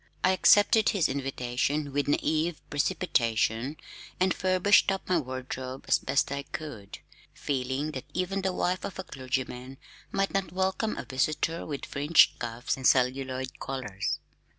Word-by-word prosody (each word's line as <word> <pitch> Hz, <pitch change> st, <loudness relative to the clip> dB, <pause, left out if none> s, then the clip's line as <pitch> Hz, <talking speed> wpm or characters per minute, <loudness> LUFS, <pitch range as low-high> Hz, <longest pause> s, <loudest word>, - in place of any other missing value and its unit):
I 185 Hz, -, +5 dB
accepted 205 Hz, +3 st, +5 dB
his 200 Hz, -7 st, +2 dB
invitation 135 Hz, +2 st, -2 dB
with 145 Hz, 0 st, 0 dB
naïve 155 Hz, +3 st, +1 dB, 0.2 s
precipitation 130 Hz, -5 st, 0 dB, 0.4 s
and 185 Hz, 0 st, +3 dB
furbished 185 Hz, +1 st, +4 dB
up 195 Hz, -, -4 dB
my 180 Hz, -2 st, +3 dB
wardrobe 130 Hz, -1 st, -6 dB
as -, -, +4 dB
best 140 Hz, +2 st, 0 dB
I 140 Hz, 0 st, -2 dB
could, 140 Hz, -9 st, -8 dB, 0.4 s
feeling 135 Hz, +2 st, -2 dB
that 130 Hz, -4 st, -6 dB
even 185 Hz, +2 st, -1 dB
the 190 Hz, 0 st, 0 dB
wife 180 Hz, 0 st, -1 dB
of 200 Hz, -, -5 dB
a 190 Hz, -, -4 dB
clergyman 130 Hz, -2 st, -4 dB, 0.3 s
might 195 Hz, 0 st, 0 dB
not 195 Hz, -3 st, -1 dB
welcome 190 Hz, +4 st, -1 dB
a -, -, -5 dB
visitor 155 Hz, +5 st, -1 dB
with 145 Hz, -3 st, -4 dB
fringed 145 Hz, +3 st, +4 dB
cuffs 120 Hz, 0 st, -2 dB
and 130 Hz, -, +2 dB
celluloid 130 Hz, 0 st, +1 dB
collars. 120 Hz, -8 st, -3 dB
140 Hz, 145 wpm, -28 LUFS, 130-185 Hz, 0.4 s, I